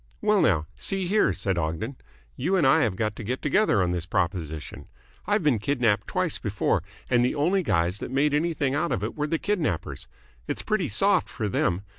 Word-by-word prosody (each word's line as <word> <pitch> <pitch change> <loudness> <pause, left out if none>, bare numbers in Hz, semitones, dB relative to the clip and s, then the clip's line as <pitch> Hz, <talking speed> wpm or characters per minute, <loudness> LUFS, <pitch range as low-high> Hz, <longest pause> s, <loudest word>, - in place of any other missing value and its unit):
"Well, 210 -2 +3
now, 80 -4 +2
see 195 -2 -2
here," 210 +4 +3
said 95 -2 -1
Ogden, 85 - -3 0.4
"you 175 +9 0
and 175 -6 +3
I 130 - +5
have 110 -6 +1
got 110 +1 -1
to - - -6
get 125 +5 -2
together 145 - +3
on 90 - 0
this 90 -1 -3
proposition. 85 -5 -3 0.4
I've 205 -2 +1
been 140 -7 +3
kidnapped 120 -3 +1
twice - - 0
before, - - 0 0.3
and 120 0 +3
the 125 - +1
only 175 +7 +2
guys 90 - 0
that - - -5
made 140 +3 +1
anything 150 -3 0
out 170 +4 0
of - - -1
it - - -3
were 150 0 -1
the 165 - 0
kidnappers. 160 - -2 0.4
It's - - -3
pretty 195 -6 0
soft 195 - +2
for 110 -5 -3
them. 95 -1 0
130 Hz, 200 wpm, -26 LUFS, -, 0.4 s, I